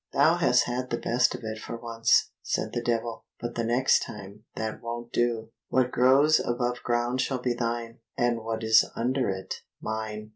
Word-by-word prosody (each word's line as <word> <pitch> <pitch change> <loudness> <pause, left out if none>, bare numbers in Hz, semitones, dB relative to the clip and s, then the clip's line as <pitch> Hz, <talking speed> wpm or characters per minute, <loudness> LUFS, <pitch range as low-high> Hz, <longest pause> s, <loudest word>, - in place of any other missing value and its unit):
"Thou - - +4
hast - - +4
had 125 +1 -3
the 120 - -1
best 120 +1 +1
of - - -8
it 110 0 -5
for 115 - -6
once," 115 -1 +2
said - - -2
the 120 - -1
Devil, 115 -1 -2 0.2
"but 120 0 -4
the 115 - -2
next 120 +3 +3
time 105 +1 -9
that 110 0 -4
won't 120 0 -6
do. 115 -2 0 0.2
What 125 -1 +2
grows 135 +5 +5
above 120 0 -1
ground 120 +1 0
shall 130 0 -1
be 125 0 0
thine, 115 -1 -3 0.2
and 120 -1 +1
what 110 0 -4
is 110 0 +6
under 125 +1 0
it, 95 0 -4 0.2
mine." 110 -1 -4
120 Hz, 185 wpm, -27 LUFS, 110-120 Hz, 0.2 s, is